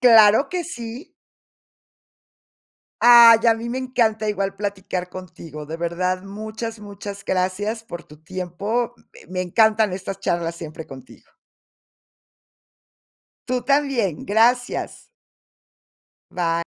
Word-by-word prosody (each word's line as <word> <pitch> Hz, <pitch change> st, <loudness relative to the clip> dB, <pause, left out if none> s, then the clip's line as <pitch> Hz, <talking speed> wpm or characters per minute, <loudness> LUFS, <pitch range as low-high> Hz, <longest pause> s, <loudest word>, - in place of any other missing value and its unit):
Claro 225 Hz, 0 st, +6 dB
que 360 Hz, -1 st, -2 dB
sí. 240 Hz, -1 st, -8 dB, 1.9 s
Ay, 235 Hz, -1 st, +9 dB
a 230 Hz, -, +6 dB
mí 230 Hz, +1 st, -6 dB
me 250 Hz, -, -3 dB
encanta 230 Hz, -4 st, 0 dB
igual 195 Hz, -1 st, -1 dB
platicar 190 Hz, -3 st, -4 dB
contigo, 165 Hz, -5 st, -9 dB
de 160 Hz, +2 st, -5 dB
verdad 180 Hz, +2 st, -2 dB
muchas, 220 Hz, +3 st, -6 dB
muchas 200 Hz, -1 st, -9 dB
gracias 195 Hz, +5 st, -1 dB
por 175 Hz, -5 st, -8 dB
tu 150 Hz, +1 st, -17 dB
tiempo, 195 Hz, +7 st, -3 dB, 0.2 s
m -, -, -17 dB
me 185 Hz, -, -1 dB
encantan 220 Hz, +2 st, +3 dB
estas 195 Hz, +1 st, -6 dB
charlas 170 Hz, -1 st, -1 dB
siempre 160 Hz, -1 st, -8 dB
contigo. 130 Hz, -2 st, -14 dB, 2.2 s
Tú 250 Hz, -1 st, -1 dB
también, 275 Hz, -, 0 dB
gracias. 240 Hz, -, +1 dB, 1.2 s
Bye. 170 Hz, -1 st, -1 dB
205 Hz, 105 wpm, -22 LUFS, 180-230 Hz, 2.2 s, Ay